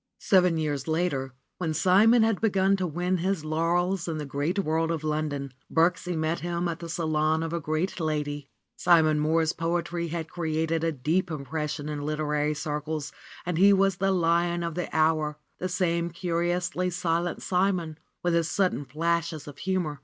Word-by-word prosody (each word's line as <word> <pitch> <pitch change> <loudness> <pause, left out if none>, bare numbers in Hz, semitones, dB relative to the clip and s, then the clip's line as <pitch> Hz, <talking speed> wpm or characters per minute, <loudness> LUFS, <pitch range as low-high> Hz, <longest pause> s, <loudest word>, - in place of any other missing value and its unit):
Seven 180 -4 +3
years 145 -3 -2
later, 155 -6 -1 0.2
when 160 -3 -1
Simon 220 +7 +5
had 225 -3 +1
begun 195 -3 +3
to 185 -1 -1
win 175 +3 -1
his 180 -2 -1
laurels 170 +3 0
in 165 -2 -2
the 150 - -4
great 145 +7 -2
world 165 -3 +1
of 165 -2 -2
London, 150 -3 -2 0.2
Birksie 175 +2 +1
met 160 +1 0
him 175 0 -2
at 165 -2 -3
the 170 - -7
salon 155 -1 +1
of 165 0 -4
a 170 - 0
great 155 +5 -2
lady. 145 -3 -2 0.3
Simon 160 -3 +4
Mohr's 160 +1 +2
poetry 170 0 -2
had 165 0 -4
created 160 -1 -1
a 165 - +2
deep 160 +6 0
impression 150 0 -4
in 150 -1 -4
literary 150 0 -1
circles 150 0 -3 0.3
and 175 -2 -1
he 200 +2 +7
was 195 -1 +3
the 195 +1 +1
lion 170 -1 +2
of 170 -1 -3
the 175 +1 -3
hour, 155 -1 +1 0.2
the 185 - -2
same 170 -2 0
curiously 175 +1 -1
silent 175 -1 -1
Simon, 180 -4 0 0.2
with 175 -1 +1
his 170 -1 +2
sudden 185 -7 0
flashes 160 +2 -1
of 145 -1 -10
humor. 180 -6 -1
165 Hz, 170 wpm, -27 LUFS, 155-180 Hz, 0.3 s, he